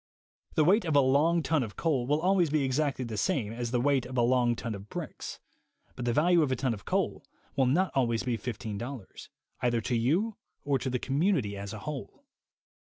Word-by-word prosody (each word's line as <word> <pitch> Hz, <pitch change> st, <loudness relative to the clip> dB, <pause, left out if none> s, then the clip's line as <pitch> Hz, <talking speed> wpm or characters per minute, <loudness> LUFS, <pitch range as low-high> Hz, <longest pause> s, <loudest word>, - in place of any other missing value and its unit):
The 155 Hz, -, +4 dB
weight 200 Hz, +7 st, +4 dB
of 160 Hz, -4 st, -1 dB
a -, -, +7 dB
long 150 Hz, +5 st, +3 dB
ton 160 Hz, -2 st, +2 dB
of 110 Hz, -4 st, -5 dB
coal 140 Hz, -7 st, 0 dB
will 150 Hz, +2 st, +2 dB
always 180 Hz, -1 st, +3 dB
be 150 Hz, -1 st, +1 dB
exactly 135 Hz, 0 st, 0 dB
the 110 Hz, -3 st, -4 dB
same 105 Hz, +1 st, 0 dB
as 120 Hz, 0 st, -3 dB
the 125 Hz, +1 st, +1 dB
weight 135 Hz, 0 st, +2 dB
of 130 Hz, 0 st, -6 dB
a -, -, +4 dB
long 120 Hz, -1 st, +3 dB
ton 115 Hz, -1 st, -4 dB
of 100 Hz, 0 st, -9 dB
bricks; -, -, -6 dB, 0.6 s
but 120 Hz, -, -5 dB
the 120 Hz, -, +2 dB
value 170 Hz, +6 st, +4 dB
of 145 Hz, -4 st, +1 dB
a -, -, +2 dB
ton 130 Hz, -1 st, 0 dB
of 100 Hz, -, -9 dB
coal -, -, -1 dB, 0.3 s
will 135 Hz, -2 st, +3 dB
not 180 Hz, +9 st, +2 dB
always 115 Hz, -4 st, +1 dB
be 125 Hz, -2 st, 0 dB
$15, 115 Hz, 0 st, -6 dB, 0.3 s
either 120 Hz, -2 st, +1 dB
to 120 Hz, +2 st, -1 dB
you 170 Hz, -, +1 dB, 0.3 s
or 140 Hz, -2 st, +2 dB
to 130 Hz, -, -2 dB
the 125 Hz, -, 0 dB
community 135 Hz, -, 0 dB
as 100 Hz, 0 st, -6 dB
a 110 Hz, -, -6 dB
whole. 150 Hz, -, -6 dB
130 Hz, 215 wpm, -29 LUFS, 120-150 Hz, 0.6 s, a